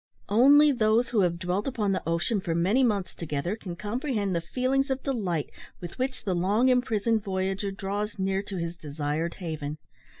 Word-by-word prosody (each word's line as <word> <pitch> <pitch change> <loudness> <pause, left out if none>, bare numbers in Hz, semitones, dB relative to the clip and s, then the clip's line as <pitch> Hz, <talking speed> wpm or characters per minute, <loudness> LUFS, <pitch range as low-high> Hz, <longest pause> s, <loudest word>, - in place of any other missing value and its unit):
Only 285 +8 +7
those 230 -1 +2
who 230 - +1
have 175 -2 +1
dwelt 185 +5 -2
upon 220 -7 0
the 185 - 0
ocean 175 +5 0
for 165 -3 -2
many 195 +10 +3
months 205 -6 0
together 165 +4 -3
can 185 -6 -7
comprehend 210 - -2
the 170 - 0
feelings 260 - 0
of 265 0 -2
delight, 195 - -2 0.3
with 175 +7 -9
which 260 0 -2
the 190 - 0
long 200 +8 +2
imprisoned 230 -3 +1
voyager 195 0 -1
draws 200 +2 -3
near 190 0 0
to 200 -1 -6
his 170 0 -3
desired 150 +2 -3
haven. 155 -4 -5
200 Hz, 175 wpm, -27 LUFS, 175-235 Hz, 0.3 s, Only